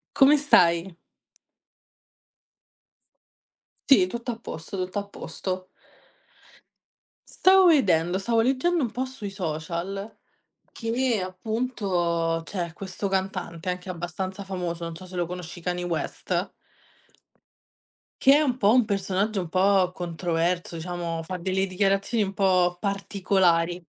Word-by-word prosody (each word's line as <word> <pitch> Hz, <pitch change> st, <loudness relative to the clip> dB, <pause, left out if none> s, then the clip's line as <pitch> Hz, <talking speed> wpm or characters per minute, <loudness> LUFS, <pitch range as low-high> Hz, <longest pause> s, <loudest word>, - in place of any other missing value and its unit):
Come 280 Hz, +2 st, +7 dB
stai? 175 Hz, -, +3 dB, 2.9 s
Sì, 265 Hz, -10 st, +7 dB
tutto 235 Hz, +5 st, -5 dB
a 225 Hz, -, -5 dB
posto, 165 Hz, -4 st, -7 dB
tutto 185 Hz, +2 st, -3 dB
a -, -, -7 dB
posto. 185 Hz, -2 st, -5 dB, 1.8 s
Stavo 375 Hz, -1 st, +7 dB
vedendo 185 Hz, -, +3 dB
stavo 225 Hz, +3 st, +1 dB
leggendo 280 Hz, +7 st, +1 dB
un 240 Hz, -, -1 dB
po' 255 Hz, +3 st, -3 dB
sui 255 Hz, -6 st, -7 dB
social 180 Hz, +3 st, -4 dB, 0.6 s
che 230 Hz, -2 st, 0 dB
appunto 185 Hz, -5 st, -1 dB
c'è 170 Hz, -3 st, -4 dB
questo 195 Hz, +2 st, -4 dB
cantante, 185 Hz, -3 st, -2 dB
anche 180 Hz, +1 st, -5 dB
abbastanza 185 Hz, +3 st, -5 dB
famoso, 175 Hz, -3 st, -4 dB
non 165 Hz, 0 st, -5 dB
so 185 Hz, +3 st, -10 dB
se 185 Hz, 0 st, -9 dB
lo 175 Hz, -, +1 dB
conosci 175 Hz, 0 st, -7 dB
Kanye 180 Hz, 0 st, -2 dB
West 170 Hz, -3 st, -2 dB, 1.7 s
che 270 Hz, -, +7 dB
è 300 Hz, -, +4 dB
un 260 Hz, -4 st, 0 dB
po', 210 Hz, -1 st, +4 dB
un 250 Hz, -2 st, +5 dB
personaggio, 200 Hz, 0 st, -1 dB
un 175 Hz, -, -5 dB
po' 185 Hz, +1 st, +3 dB
controverso, 175 Hz, 0 st, -2 dB
diciamo 170 Hz, -1 st, -4 dB
fa 180 Hz, +3 st, -5 dB
delle 190 Hz, +2 st, 0 dB
dichiarazioni, 195 Hz, +4 st, +1 dB
un 195 Hz, 0 st, -3 dB
po' 185 Hz, -3 st, +3 dB
particolari. 185 Hz, -3 st, +1 dB
185 Hz, 120 wpm, -25 LUFS, 175-210 Hz, 2.9 s, Come